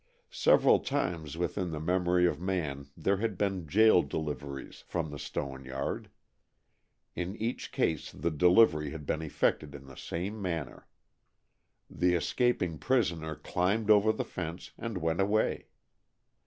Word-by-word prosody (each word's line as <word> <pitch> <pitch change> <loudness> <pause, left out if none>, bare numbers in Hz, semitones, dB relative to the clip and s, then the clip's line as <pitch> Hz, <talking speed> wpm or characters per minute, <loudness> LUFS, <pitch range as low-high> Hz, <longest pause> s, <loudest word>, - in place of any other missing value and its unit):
Several - - +5
times 80 -3 -2
within 90 +2 -1
the 80 -2 -4
memory 90 +2 +2
of 85 - 0
man 75 -7 -2
there 95 +5 +1
had 105 -2 -2
been 95 -4 -1
"jail 110 +2 +6
deliveries" 70 -2 -5
from 80 -3 -2
the 75 - -7
stone 65 -1 -5
yard. 65 +1 -4 1.1
In 90 +3 -3
each 115 +2 -3
case 80 -2 -1
the 85 - -2
delivery 80 -1 +4
had 75 -1 -7
been 75 - -1
effected 75 -1 -1
in 70 -1 -10
the 65 - -12
same 95 +10 -5
manner. 85 -7 -4 1.0
The 90 0 +1
escaping 90 - 0
prisoner 85 -11 0
climbed 100 +8 0
over 105 +1 +6
the 110 - -3
fence 85 0 -6
and 115 -4 -5
went 80 +1 0
away. 105 +2 +1
85 Hz, 140 wpm, -30 LUFS, 75-95 Hz, 1.1 s, jail